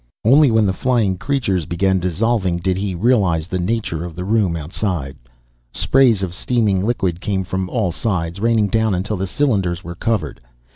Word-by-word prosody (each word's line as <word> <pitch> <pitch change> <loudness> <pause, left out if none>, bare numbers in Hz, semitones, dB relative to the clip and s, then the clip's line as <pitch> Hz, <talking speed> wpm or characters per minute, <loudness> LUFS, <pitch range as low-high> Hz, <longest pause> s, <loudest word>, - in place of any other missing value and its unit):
Only 140 +5 +6
when 110 -2 +3
the 95 - +1
flying 115 -5 +1
creature 100 - -1
began 95 +2 +1
dissolving 95 +1 0
did 90 +1 -1
he 95 -1 -3
realize 95 -6 +2
the 90 +1 -3
nature 90 -4 -2
of 85 -2 -7
the 90 - -5
room 100 -4 +1
outside. 80 -3 -3 0.6
Sprays 120 - +3
of 90 -2 -3
steaming 100 -2 0
liquid 95 -7 -1
came 100 -3 -1
from 95 0 -3
all 110 -7 0
sides, 85 -2 -2
raining 110 -1 +2
down 110 -2 +1
until 100 +4 -2
the 95 +1 -2
cylinders 95 -9 0
were 85 - -6
covered. 110 - -2
95 Hz, 175 wpm, -19 LUFS, 90-115 Hz, 0.6 s, Only